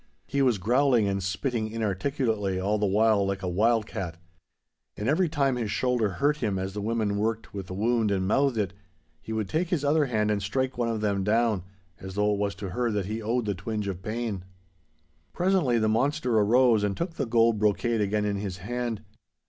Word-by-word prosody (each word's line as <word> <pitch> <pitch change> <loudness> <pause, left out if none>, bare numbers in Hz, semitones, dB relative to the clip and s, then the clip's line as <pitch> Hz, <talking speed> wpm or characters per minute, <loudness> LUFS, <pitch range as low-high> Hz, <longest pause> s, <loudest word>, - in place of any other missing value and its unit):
He 140 +1 -1
was 125 -5 +3
growling 120 +2 +3
and 100 0 -1
spitting 110 +5 -2
inarticulately 110 -2 -1
all 105 +3 0
the 105 - +2
while 105 +1 +3
like 95 0 -2
a - - -1
wild 110 +5 +2
cat. 85 -5 -5 0.8
And 105 - -3
every 165 +5 +2
time 140 -4 +1
his 115 -3 -2
shoulder 120 -3 0
hurt 145 +10 +1
him 105 -9 -1
as 95 +1 -3
the 105 - -4
women 105 -1 0
worked 110 +1 -2
with 100 -2 -6
the 95 - -6
wound 115 +1 +1
and 95 -2 0
mouthed 135 +3 +2
it, 100 -3 -1 0.5
he - - -8
would 110 -2 -1
take 165 - -1
his 155 -5 0
other 150 0 +3
hand 105 -3 +1
and 105 -1 0
strike 130 +6 -1
one 120 -1 0
of 110 -2 -2
them 100 -2 0
down, 110 -1 +2 0.4
as 95 0 -8
though 105 0 +2
it 100 - -2
was 100 -1 -1
to 100 - -6
her 120 +5 0
that 105 -3 -1
he 110 +3 -4
owed 115 +2 -1
the 100 - 0
twinge 105 +2 -4
of 95 -2 -4
pain. 110 -2 -3 0.9
Presently 175 -9 +2
the 110 -1 +2
monster 125 +2 +1
arose 115 +1 +4
and 100 -1 -1
took 170 0 -3
the 140 - -3
gold 115 -1 +3
brocade 110 +2 +1
again 105 +1 0
in 100 -1 -1
his 100 -2 -4
hand. 115 +2 -4
110 Hz, 210 wpm, -27 LUFS, 100-120 Hz, 0.9 s, arose